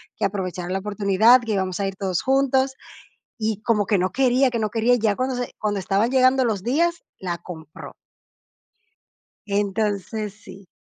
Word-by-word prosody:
que - - -1
aprovechara 185 -3 -3
la 190 +1 -1
oportunidad, 210 +4 +4
que 225 -2 -3
íbamos 190 -1 -2
a 195 - 0
ir 195 - -5
todos 190 -3 -2
juntos. 265 0 +2 0.6
Y 215 -1 -2
como 210 -4 +1
que 205 - +2
no 185 0 0
quería 260 0 +3
que 235 - -2
no 215 -2 -1
quería. 235 +2 +2
Y - - +1
ya 210 -2 +1
cuando 255 0 -1
se 245 - -4
cuando 205 -2 -1
estaban 200 +5 +1
llegando 260 0 +4
los 210 -5 -1
días, 335 +8 0 0.2
la 175 -2 -4
compró. 160 -3 -10 1.5
Entonces, 205 0 -2
sí. 195 -2 -14
210 Hz, 170 wpm, -23 LUFS, 195-245 Hz, 1.5 s, oportunidad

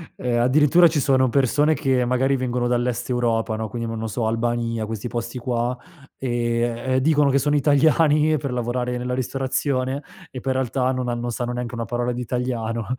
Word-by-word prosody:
Ehm, 120 -1 -1
addirittura 150 +7 +5
ci 155 -2 0
sono 130 -1 +3
persone 145 +4 +2
che, 130 -4 +1
magari 130 +2 +1
vengono 125 -1 -1
dall'Est 120 0 -1
Europa, 115 -3 0
no, 110 0 -3
quindi 115 +2 -5
mò 115 - -4
non 110 0 -4
so, 110 +1 -2
Albania, 115 -1 -1
questi 110 +1 -5
posti 120 +1 -4
qua, 120 0 -1 0.4
e, 120 -2 -1 0.3
ehm, 130 0 +1
dicono 145 -1 +3
che 140 - +3
sono 145 +2 +1
italiani 150 +2 +3
per 135 -1 -4
lavorare 125 0 -2
nella 125 0 -2
ristorazione 130 +1 -2 0.3
e 130 - -7
poi 135 +1 -2
in 130 - 0
realtà 130 0 0
non 130 -1 -2
han 120 - -2
non 120 0 -3
sanno 120 +1 -3
neanche 120 0 -4
una 115 -1 -3
parola 120 +1 -2
di 125 0 -4
italiano, 115 -2 -2
125 Hz, 195 wpm, -22 LUFS, 120-135 Hz, 0.4 s, addirittura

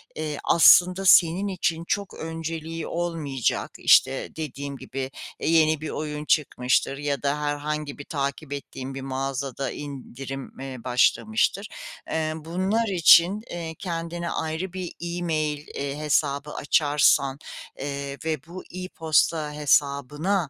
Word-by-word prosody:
eee, 155 -2 -3
aslında 180 +3 +6
senin 180 +2 +6
için 175 -3 -1
çok 200 -2 -2
önceliği 165 0 -5
olmayacak, 160 -7 -2
işte, 135 0 +4
dediğim 140 -2 -5
gibi, 135 0 -5 0.3
eee, - - -1
yeni 155 -2 +4
bir 155 - -4
oyun 150 -1 -4
çıkmıştır 135 -3 +1
ya 145 -1 -2
da 145 +1 0
herhangi 145 0 -3
bir 145 - -9
takip 140 0 -3
ettiğin 135 -1 -6
bir 135 - -6
mağazada 135 0 -3
indirim, 135 -1 -7
eee, 135 -1 -6
başlamıştır. 195 - +2 0.4
Eee, 155 -1 -1
bunlar 185 +8 -1
için, 180 +2 +6
eee, 165 -2 -5
kendine 170 -1 -4
ayrı 160 +4 -3
bir 185 -2 -5
e-mail, 160 -4 -2
eee, 140 0 -4
hesabı 150 -1 0
açarsan, 145 -2 +3 0.4
eee, 140 0 -4
ve 160 -1 0
bu 180 +2 -8
e-posta 160 -4 0
hesabına 150 +4 +1
150 Hz, 125 wpm, -25 LUFS, 140-170 Hz, 0.4 s, aslında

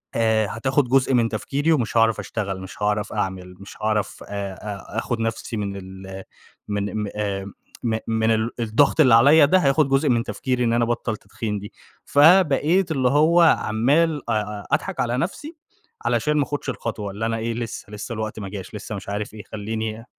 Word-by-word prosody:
آآ 110 -2 +2
هتاخد 130 +6 0
جزء 135 0 +3
من 115 -2 +3
تفكيري 140 +8 -1
ومش 120 -7 +1
هاعرف 115 -1 +3
أشتغل، 100 -4 -4
مش 95 +2 -10
هاعرف 105 0 0
أعمل، 95 -3 -3
مش 100 - -11
هاعرف 110 -1 -1
آآ، 100 -1 -4
أ 105 +1 -7
آخُد 115 0 -3
نفَسي 115 0 -3
من 100 -1 -3
ال 95 0 -9 0.4
من 105 +1 -2
م - - -3
آآ 100 -2 -2 0.4
م 115 -2 0
من 110 0 +1
ال 110 +1 +1
الضغط 120 +7 +2
اللي 130 -6 +7
عليّا 145 +6 +7
ده 185 +7 +4
هياخد 140 -2 +3
جزء 135 +2 +2
من 120 -2 +2
تفكيري 125 0 -2
إن 115 -1 +2
أنا 120 0 +2
أبطّل 120 0 -1
التدخين 105 0 -5
دي، 105 +1 -10 0.3
فبقيت 165 +2 +4
اللي 130 -4 +2
هو 155 +5 +4
عَمّال 145 +1 +2
أ - - +2
أ 105 -1 -3
أضحك - - -1
على 120 0 0
نفسي، 290 - -4 0.5
علشان 150 0 +1
ما 145 - +3
آخدش 145 +1 -4
الخطوة، 110 -5 -4
اللي 105 +3 -4
أنا 115 0 -1
إيه، 115 +1 -2
لسّه، 115 -3 -6
لسّه 105 +3 -6
الوقت 110 -1 -4
ما 100 -2 -6
جاش، 95 0 -8
لسّه 105 +1 -6
مش 100 0 -7
عارف 105 +1 -4
إيه، 105 - -8
خلّيني 110 +1 -4
115 Hz, 190 wpm, -23 LUFS, 105-135 Hz, 0.5 s, اللي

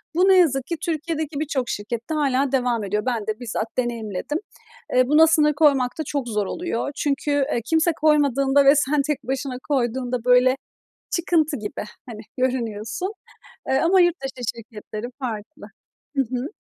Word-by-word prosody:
bu, 365 +3 +4
ne 380 - +7
yazık 270 -7 +3
ki 335 - -3
Türkiye'deki 315 -2 -2
birçok 270 -5 -2
şirkette 230 +7 -4
hâlâ 275 -2 +1
devam 245 -4 +1
ediyor. 210 +2 -2
Ben 235 -5 -1
de 215 +2 -2
bizzat 225 -1 -4
deneyimledim. 235 +1 -2 0.6
Eee, 255 0 +4
buna 305 +3 +6
sınır 300 -2 +4
koymak 275 -4 +3
da - - 0
çok 280 -3 -3
zor 210 -2 0
oluyor 285 - -3
çünkü, 290 0 -1
eee, 285 -3 +1
kimse 320 +6 +3
koymadığında 280 -2 +3
ve 275 +2 +7
sen 290 0 +2
tek 295 -2 -2
başına 265 +1 -3
koyduğunda 250 -2 -1
böyle 250 +1 +5 0.6
"çıkıntı 320 -3 +1
gibi," 210 -1 -5 0.3
hani, 215 -2 -8 0.2
görünüyorsun. 245 - -2 0.6
Eee, 265 - +3
ama 370 +6 +4
yurt 350 -1 +3
dışı 265 -2 -6
şirketleri 220 0 -8
farklı. 240 +3 -6 0.5
Hı - - +5
hı. 250 +2 -4
265 Hz, 160 wpm, -23 LUFS, 240-300 Hz, 0.6 s, ne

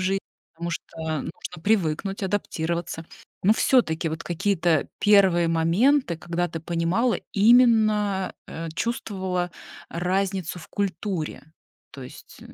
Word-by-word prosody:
жи 190 +1 +1 0.4
потому 170 +1 -4
что 170 - -7 0.3
нужно 165 0 -8
привыкнуть, 195 -1 0
адаптироваться. 170 -4 -2 0.4
Но 200 - +5
всё-таки 175 -9 +2
вот 160 +1 -5
какие-то 175 -3 +1
1 190 -5 +5
моменты, 170 - +2
когда 175 +2 -2
ты 165 -2 -6
понимала, 170 +9 0
именно, 215 -3 +4
э, 165 0 -6
чувствовала 190 -6 -2 0.4
разницу 185 0 -1
в - - -13
культуре, 190 -4 -3 0.5
то 135 - -10
есть - - -13
180 Hz, 110 wpm, -25 LUFS, 165-205 Hz, 0.5 s, Но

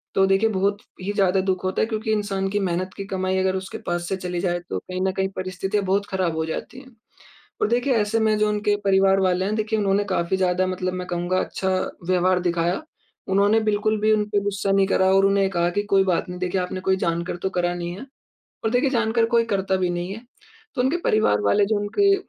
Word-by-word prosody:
तो 195 - +5
देखिए 195 +3 +3
बहुत 200 0 0 0.2
ही 195 +2 -2
ज़्यादा 195 -2 +2
दुख 185 -1 -1
होता 185 0 0
है। - - +3
क्योंकि 220 0 -2
इंसान 200 -2 -1
की 205 +1 0
मेहनत 185 -1 -2
की 195 - -5
कमाई 190 -1 -1
अगर 190 0 +1
उसके 190 0 -5
पास 175 0 -2
से 195 - 0
चली 180 -1 -4
जाए 175 -1 0
तो 95 - -2
कहीं 185 - -6
न - - +1
कहीं 190 0 -1
परिस्थितियाँ 185 +2 -2
बहुत 195 +2 +1
खराब 185 -4 -1
हो 160 0 -1
जाती 160 +10 -6
हैं। 260 -2 -16 0.7
और - - +3
देखिए 245 +3 +1
ऐसे 210 +1 +1
में 220 -1 +2
जो 215 0 +2
उनके 210 0 +1
परिवार 195 0 +4
वाले 185 0 +1
हैं 210 +2 -1
देखिए 215 0 -1
उन्होंने 200 0 +2
काफ़ी 170 +1 0
ज़्यादा 185 0 +1
मतलब 185 0 -2
मैं 180 0 -5
कहूँगा 175 +1 -1
अच्छा 190 - -2 0.4
व्यवहार 185 0 +3
दिखाया। 175 - 0 0.5
उन्होंने 200 +3 +3
बिल्कुल 215 +1 +1
भी 215 +1 +3
उनपे 210 -1 +1
गुस्सा 200 -1 -1
नहीं 195 0 +3
करा 190 -1 +3
और 195 0 +5
उन्हें 195 0 +3
कहा 175 -2 +1
कि 205 - +2
कोई 195 -1 +6
बात 180 -1 0
नहीं 180 0 -6
देखिए 185 +1 -1
आपने 180 +1 -4
कोई 190 0 +1
जानकर 170 0 -2
तो 190 - +1
करा 175 -1 0
नहीं 175 0 -4
है। 260 - -8 0.6
और 220 - +1
देखिए 250 +3 +2
जानकर 230 -2 +2
कोई 235 0 +2
करता 195 -1 +1
भी 185 -1 0
नहीं 175 +2 -3
है। 225 - -10 0.5
तो - - -2
उनके 265 +7 +1
परिवार 160 - +3
वाले 105 - +3
जो 215 +1 +1
उनके 395 - +3
190 Hz, 230 wpm, -23 LUFS, 185-210 Hz, 0.7 s, कोई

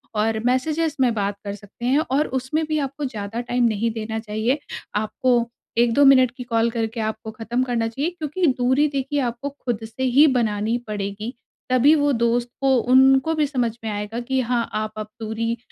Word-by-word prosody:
और 220 +1 +1
मैसेजेज़ 305 +5 +1
में 245 -3 +3
बात 200 -1 -2
कर 200 -1 -4
सकते 205 +4 -10
हैं 270 +4 +3
और 295 +3 +2
उसमें 300 +5 -2
भी 310 0 0
आपको 280 +1 -3
ज़्यादा 220 -3 -5
टाइम 245 0 0
नहीं 225 0 +1
देना 220 0 -4
चाहिए। 220 +6 -1 0.4
आपको 215 +4 +1 0.4
1-2 240 +4 +4
मिनट 255 -2 +6
की 250 - -5
कॉल 230 -1 +1
करके 225 0 -3
आपको 220 0 -4
खत्म 230 +3 -2
करना 235 -3 0
चाहिए, 275 +9 -2
क्योंकि 345 +1 -2
दूरी 260 +4 +3
देखिए 280 0 -2
आपको 245 +2 -2
खुद 240 -5 -4
से 225 +4 -6
ही 260 +4 +5
बनानी 225 -3 +1
पड़ेगी, 210 +3 -4 0.4
तभी 255 +4 +5
वो 290 -1 +2
दोस्त 235 0 +1
को 270 -1 +4
उनको 265 +5 +4
भी 305 - +2
समझ 245 -4 0
में 220 - -2
आएगा 210 +2 -4
कि 260 +2 -1
हाँ, 235 -1 -1
आप 215 0 -2
अब 215 - -4
दूरी 230 +1 -2
240 Hz, 185 wpm, -22 LUFS, 220-270 Hz, 0.4 s, मिनट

